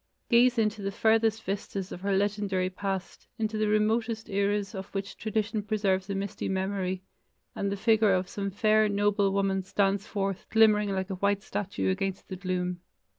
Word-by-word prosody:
Gaze 245 +1 +5
into 215 -1 +1
the 195 0 -2
farthest 225 +1 +2
vistas 195 0 -4
of 175 - -7
her 195 0 +1
legendary 200 -2 0
past, 195 0 -4
into 220 -1 -2
the 215 0 +1
remotest 220 +1 +1
eras 200 0 0
of 190 -1 -6
which 195 0 -3
tradition 215 0 -1
preserves 200 -2 0
a 200 - -1
misty 195 0 -3
memory, 190 -1 -2 0.5
and 200 0 -2
the 200 - -2
figure 220 -1 +4
of 185 0 0
some 200 +1 -3
fair, 215 +2 +3
noble 205 -1 +2
woman 195 -1 +1
stands 200 +2 0
forth 195 -2 -3
glimmering 215 -2 +4
like 190 0 -2
a - - -2
white 200 0 +1
statue 200 -1 -2
against 195 0 -3
the 190 - -4
gloom. 180 -1 -2
200 Hz, 175 wpm, -28 LUFS, 195-215 Hz, 0.5 s, Gaze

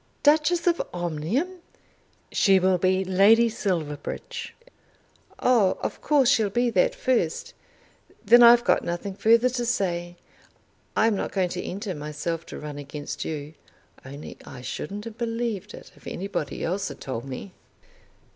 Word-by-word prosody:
"Duchess 315 +3 +3
of 345 -1 +3
Omnium!" 175 - -2 0.7
"She 195 -1 +4
will 185 -1 +2
be 185 +1 +2
Lady 205 +5 +5
Silverbridge." 175 - -4 0.8
"Oh; 225 -7 +3
of - - -4
course 285 -4 +3
she'll 225 -6 +3
be 240 +4 +1
that - - +2
first. 250 - -1 0.7
Then 240 +4 +7
I've 240 0 +8
got - - +2
nothing 175 +3 -4
further 230 +5 +4
to 245 -1 -2
say. 175 -7 -1 0.8
I'm 220 0 +3
not - - -3
going 185 -2 0
to - - -4
enter 195 +1 -5
myself 150 +2 -4
to - - -8
run 150 -1 -7
against 145 +1 -6
you. 150 -1 -5 0.5
Only 140 +3 -9
I 125 - -10
shouldn't 195 - -6
have 230 0 -9
believed 230 -4 -3
it - - -13
if - - -15
anybody 185 -6 -4
else 190 +3 -1
had - - -8
told 130 -3 -5
me." 135 +8 -7
195 Hz, 145 wpm, -25 LUFS, 165-235 Hz, 0.8 s, I've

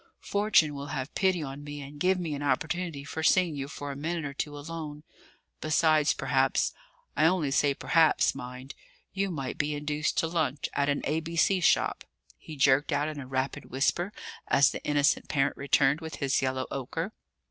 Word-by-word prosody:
Fortune 200 -7 +3
will 140 0 -6
have 135 -1 -4
pity 185 -4 +1
on 140 +1 -7
me 145 0 -7
and 145 +1 -9
give 185 +3 +2
me 165 -4 -3
an 145 - -4
opportunity 160 +2 -1
for 150 +3 -5
seeing 175 0 +3
you 135 -1 -4
for 145 -1 -6
a - - -6
minute 160 +3 -3
or 140 - -4
two 145 +1 -4
alone. 150 0 -7 0.6
Besides, 155 -1 +3
perhaps 135 -1 +1 0.4
I 155 - +3
only 165 -5 +1
say 140 0 +2
perhaps, 160 +2 +3
mind! 125 +2 -8 0.4
you 195 0 0
might 135 -7 -4
be 150 0 0
induced 150 0 -2
to 165 - +2
lunch 155 -4 -1
at 140 0 +1
an 145 - 0
A.B.C. 165 +5 +1
shop," - - +2 0.4
he 155 - -9
jerked 140 +2 +3
out 145 +1 +1
in 150 -2 -6
a 130 - -7
rapid 130 +1 -2
whisper, 170 +8 0 0.4
as 140 0 +5
the - - -7
innocent 145 0 +2
parent 140 -1 +1
returned 140 +2 +2
with 160 0 -6
his 140 -2 0
yellow 130 0 -1
ochre. 135 -3 -4
145 Hz, 180 wpm, -28 LUFS, 140-160 Hz, 0.6 s, as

